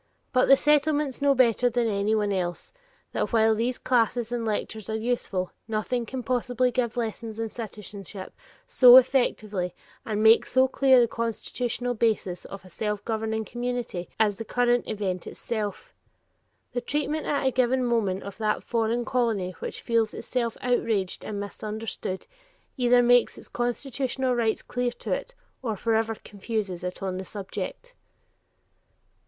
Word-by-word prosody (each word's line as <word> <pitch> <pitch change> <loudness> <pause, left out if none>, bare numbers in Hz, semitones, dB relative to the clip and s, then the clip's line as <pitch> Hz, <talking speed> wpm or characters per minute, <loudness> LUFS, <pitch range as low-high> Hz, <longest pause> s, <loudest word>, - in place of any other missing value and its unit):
But 255 0 +4
the 275 - +8
Settlements 295 -2 +2
know 280 -1 +4
better 245 -1 +4
than 240 0 +1
anyone 205 0 +1
else 175 -2 -3 0.4
that - - -1
while 225 -1 +4
these 235 +3 -1
classes 240 -1 +1
and 240 -1 -1
lectures 220 -1 -3
are 220 - -1
useful, 220 -5 -2 0.2
nothing 225 +2 -1
can 260 -2 -5
possibly 250 0 +1
give 240 0 -1
lessons 225 -1 -3
in 225 0 -2
citizenship 205 -3 -8 0.3
so 250 -1 +9
effectively 215 -8 +2 0.3
and 215 -1 -1
make 220 +1 +6
so 260 +1 +4
clear 265 -1 +5
the 240 - +4
constitutional 235 +2 -2
basis 215 -6 0
of 195 -1 -9
a - - -13
self 210 +2 -3
governing 220 -1 -2
community 240 -8 -4
as 210 -2 +2
the - - -3
current 245 +1 +1
event 195 -4 -3
itself. 225 - -4 0.8
The 245 - -2
treatment 295 +4 -2
at 285 -2 0
a 265 - +3
given 255 0 +2
moment 210 -6 0
of 200 +2 -9
that 215 -1 0
foreign 230 +1 0
colony 225 -8 0
which - - -6
feels 230 -2 +1
itself 235 -3 -2
outraged 225 -6 0
and 205 -1 -4
misunderstood, 210 -1 -5 0.5
either 245 -1 +4
makes 245 0 +4
its - - -11
constitutional 255 +1 -1
rights 230 -2 0
clear 245 0 -1
to - - -3
it, - - -4 0.3
or 225 -5 -2
forever 225 +1 +1
confuses 200 -3 -4
it 180 +2 -5
on 185 -1 -2
the - - -4
subject. 220 - -6
230 Hz, 150 wpm, -26 LUFS, 210-245 Hz, 0.8 s, so